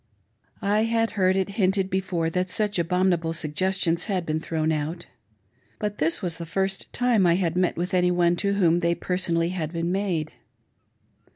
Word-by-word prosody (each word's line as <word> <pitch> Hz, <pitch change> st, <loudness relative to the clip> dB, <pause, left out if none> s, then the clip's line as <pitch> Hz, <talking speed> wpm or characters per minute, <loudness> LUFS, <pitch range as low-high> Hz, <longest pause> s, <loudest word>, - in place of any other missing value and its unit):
I 210 Hz, +2 st, +2 dB
had 225 Hz, 0 st, +1 dB
heard 190 Hz, -3 st, +2 dB
it 190 Hz, 0 st, 0 dB
hinted 190 Hz, 0 st, +2 dB
before 180 Hz, -3 st, -1 dB
that 180 Hz, +2 st, -1 dB
such 205 Hz, -1 st, 0 dB
abominable 175 Hz, -1 st, +1 dB
suggestions 170 Hz, +2 st, 0 dB
had 185 Hz, -5 st, -1 dB
been 155 Hz, 0 st, -1 dB
thrown 160 Hz, -1 st, -1 dB
out, 160 Hz, +3 st, -3 dB, 0.7 s
but 210 Hz, -1 st, -4 dB
this 165 Hz, +6 st, +1 dB
was 175 Hz, -2 st, -2 dB
the 170 Hz, -, -5 dB
first 190 Hz, +3 st, -2 dB
time 245 Hz, -4 st, +2 dB
that 180 Hz, -, +4 dB
I -, -, +5 dB
had 175 Hz, -2 st, 0 dB
met 180 Hz, -1 st, +1 dB
with 180 Hz, +2 st, -3 dB
any 180 Hz, -1 st, +3 dB
one 175 Hz, -1 st, +2 dB
to 200 Hz, +2 st, 0 dB
whom 175 Hz, -4 st, +3 dB
they 170 Hz, -1 st, +1 dB
had -, -, -23 dB
per 180 Hz, -, -1 dB
sonally 170 Hz, -2 st, -1 dB
been 170 Hz, 0 st, -2 dB
made. 180 Hz, -6 st, -1 dB
180 Hz, 185 wpm, -25 LUFS, 165-190 Hz, 0.7 s, I